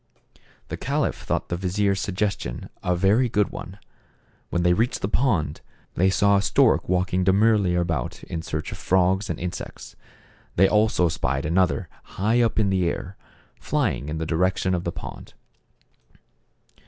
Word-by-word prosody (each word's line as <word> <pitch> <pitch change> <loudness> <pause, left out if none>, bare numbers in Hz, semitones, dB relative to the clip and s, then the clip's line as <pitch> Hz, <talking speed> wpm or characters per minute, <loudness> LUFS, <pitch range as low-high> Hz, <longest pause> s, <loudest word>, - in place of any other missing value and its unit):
The - - -4
caliph - - 0
thought - - -3
the - - -1
vizier's 95 +2 0
suggestion 95 - -3
a 90 - 0
very 105 +8 +3
good 105 -2 +1
one. 95 +3 -8 0.7
When 85 - 0
they 90 0 +4
reached 115 +7 0
the - - +1
pond, 100 - 0 0.3
they 95 +2 +3
saw 100 +1 +3
a - - +2
stork - - +3
walking 90 0 +1
demurely 100 -1 +3
about 85 -7 -2
in 80 - -5
search 75 -1 -4
of - - -7
frogs 95 +2 +2
and 85 - -3
insects. 90 +1 -6 0.6
They 95 +2 +5
also 105 -4 +3
spied 70 -4 -1
another 90 +2 +1 0.3
high 110 +5 +2
up 115 -2 +1
in 105 -3 +2
the 90 -3 +2
air, 90 +3 -5 0.4
flying 70 - -1
in 80 - -3
the 80 - -2
direc 90 +4 +1
tion 95 - 0
of 90 -1 -2
the 85 - -1
pond. - - -9
95 Hz, 160 wpm, -24 LUFS, 85-100 Hz, 0.7 s, They